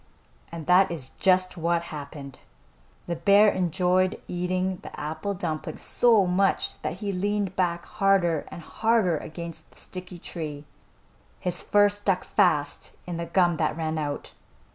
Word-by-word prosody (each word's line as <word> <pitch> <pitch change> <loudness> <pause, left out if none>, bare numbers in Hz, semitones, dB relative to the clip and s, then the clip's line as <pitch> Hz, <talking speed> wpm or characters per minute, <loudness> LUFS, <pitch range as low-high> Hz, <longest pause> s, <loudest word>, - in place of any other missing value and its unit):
And 165 -2 -7
that 185 +3 +5
is 150 -6 -5
just 185 -1 +2
what 170 +1 0
happened. 140 -2 -8 0.7
The 170 - -2
bear 200 +5 +5
enjoyed 185 +1 +1
eating 180 +1 -1
the - - -9
apple 155 +7 -3
dumpling 165 -4 -4
so 225 -5 +5
much 185 +2 0
that - - -2
he 200 - 0
leaned 200 +1 -1
back 175 -2 0
harder 185 -6 +1
and 170 - -9
harder 220 -4 +1
against 165 0 -8
the - - -20
sticky 180 -1 -7
tree. 150 -4 -7 0.7
His 180 -1 -3
fur 205 0 +4
stuck 205 -2 -1
fast 155 -8 +1
in 175 -2 -4
the 170 0 -4
gum 175 -1 +2
that - - 0
ran 160 -1 -2
out. 145 -1 -4
180 Hz, 145 wpm, -26 LUFS, 160-190 Hz, 0.7 s, that